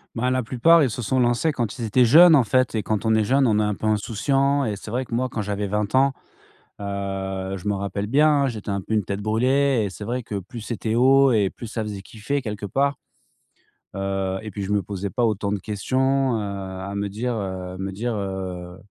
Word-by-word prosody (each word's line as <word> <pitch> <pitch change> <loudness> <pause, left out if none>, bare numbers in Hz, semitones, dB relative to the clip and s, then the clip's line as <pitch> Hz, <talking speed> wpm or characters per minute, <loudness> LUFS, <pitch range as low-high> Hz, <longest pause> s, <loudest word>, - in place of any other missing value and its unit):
Ben 125 +2 0
la 130 -1 0
plupart, 150 +8 +4
ils 130 - +1
se 125 - -4
sont 130 +4 0
lancés 120 +6 +2
quand 120 -4 -3
ils 115 - -2
étaient 120 +4 +4
jeunes 160 +7 +8
en 135 - +5
fait 130 +2 +1
et 110 - -1
quand 105 0 -1
on 110 -1 +3
est 110 - +3
jeune, 135 +5 +3
on 105 -2 +2
est - - +2
un 105 0 0
peu 110 - -3
insouciant 135 +7 +1
et 110 -5 -1
c'est 105 +2 -9
vrai 125 +3 -1
que 115 - -4
moi 130 +2 0
quand 115 -3 -4
j'avais 105 0 -2
20 105 +3 -1
ans, 135 +1 +4 0.7
heu, 95 -1 -4
je 95 - -10
me 105 - +1
rappelle 100 +1 -3
bien, 145 +4 +4
hein, - - +3
j'étais 110 -5 -5
un 100 0 -1
peu 110 - -4
une 105 - +2
tête 100 +2 -4
brûlée 125 +4 +2
et 100 - -3
c'est 105 - -8
vrai 125 +4 -2
que, 110 -2 -5
plus 100 +5 -9
c'était 110 0 -3
haut 135 +2 +5
et 105 -4 +2
plus 120 - -9
ça 110 0 -4
faisait 105 -2 -6
kiffer 115 +8 -3
quelque 105 -5 -5
part. 140 +7 0 1.0
Heu, 95 -1 -2
et 110 -1 -7
puis 100 - -6
je 95 - -4
me 105 -1 +2
posais 100 +1 -5
pas 120 +5 0
autant 105 -2 -1
de 105 - -1
questions, 130 +6 0
heu, - - -2
à 100 -1 -5
me 100 0 -2
dire, 120 +5 -3
heu, 95 -3 -5
me 95 +1 -4
dire, 115 +4 -3
heu, 95 -3 -5
110 Hz, 240 wpm, -23 LUFS, 100-125 Hz, 1.0 s, jeunes